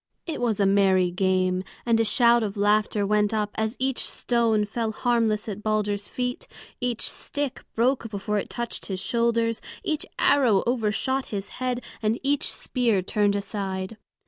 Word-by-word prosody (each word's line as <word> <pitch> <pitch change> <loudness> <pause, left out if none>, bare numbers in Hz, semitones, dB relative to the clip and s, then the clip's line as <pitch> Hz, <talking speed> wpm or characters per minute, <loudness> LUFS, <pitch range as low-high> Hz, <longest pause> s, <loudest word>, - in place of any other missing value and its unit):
It 320 -7 -4
was 225 -4 0
a 200 - +4
merry 190 -2 +3
game, 185 0 +1 0.2
and 230 -1 +3
a - - +4
shout 235 +2 +4
of 210 -1 -3
laughter 210 0 +2
went 210 +1 +2
up 210 -1 -1
as 220 +2 -2
each 265 0 0
stone 230 -3 +1
fell 220 +1 -2
harmless 225 -2 +1
at 210 -1 -5
Balder's 210 -1 -1
feet, 250 0 -3 0.3
each 245 -2 0
stick 285 -2 -3
broke 235 0 +1
before 210 0 -2
it - - -5
touched 235 -1 -4
his 190 -2 -3
shoulders, 230 +1 0 0.2
each 320 -5 -2
arrow 245 -9 +4
overshot 245 +3 0
his 200 -2 -5
head, 250 -1 -1 0.2
and 220 +1 0
each 285 +1 +1
spear 230 -7 0
turned 205 +1 +1
aside. 195 0 -3
220 Hz, 160 wpm, -25 LUFS, 205-240 Hz, 0.3 s, a